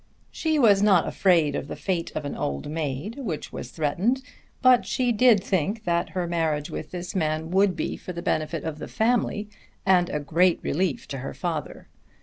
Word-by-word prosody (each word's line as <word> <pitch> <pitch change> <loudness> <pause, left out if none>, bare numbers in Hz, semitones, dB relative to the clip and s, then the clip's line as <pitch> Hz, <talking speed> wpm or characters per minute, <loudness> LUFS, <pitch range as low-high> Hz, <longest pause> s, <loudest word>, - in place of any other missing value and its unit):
She 315 -1 0
was 210 -8 +5
not 195 -5 +4
afraid 165 -7 +3
of - - -3
the - - -5
fate 180 -4 -2
of 150 - -3
an 145 - -4
old 70 - -3
maid 155 - -4
which 190 - -5
was - - -6
threatened, 185 - 0 0.4
but 255 -1 +5
she 250 -2 0
did 230 -3 +5
think 200 +4 -1
that 170 -2 0
her 180 - 0
marriage 160 -3 -1
with 155 - -5
this 180 0 -6
man 160 -1 -1
would 190 0 +3
be - - -2
for - - -7
the 170 -1 -6
benefit 155 0 -1
of 155 -1 -4
the - - -6
family 220 -2 0 0.4
and 180 -2 +4
a 150 - -1
great 165 +5 +2
relief 170 -2 -1
to 135 - -4
her 135 - -6
father. 155 +1 -4
175 Hz, 190 wpm, -25 LUFS, 155-205 Hz, 0.4 s, was